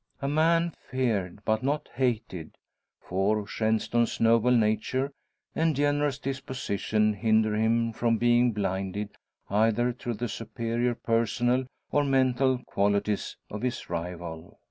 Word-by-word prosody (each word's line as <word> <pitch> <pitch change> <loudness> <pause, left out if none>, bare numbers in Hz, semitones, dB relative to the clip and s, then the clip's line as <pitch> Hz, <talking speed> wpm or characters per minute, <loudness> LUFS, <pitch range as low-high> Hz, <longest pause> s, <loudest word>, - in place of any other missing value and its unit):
A 140 - -2
man 165 +3 +2 0.2
feared 105 -7 -1
but 110 0 +1
not 145 +3 -1
hated 115 -9 -2 0.4
for 100 +3 0
Shenstone's 110 +2 0
noble 115 +1 +4
nature 120 +4 +1 0.4
and 160 -1 +1
generous 145 0 +1
disposition 125 -6 -1
hinder 110 +1 +2
him 115 +1 +1
from 115 0 +1
being 120 +1 +4
blinded 100 0 -2 0.4
either 115 +4 +2
to 120 -1 -4
the 120 +3 -3
superior 115 +2 -2
personal 120 +3 +1 0.3
or 145 - +3
mental 130 -1 +2
qualities 100 +1 0
of 105 - -5
his 125 -1 -3
rival. 85 -1 -6
115 Hz, 120 wpm, -27 LUFS, 105-130 Hz, 0.4 s, noble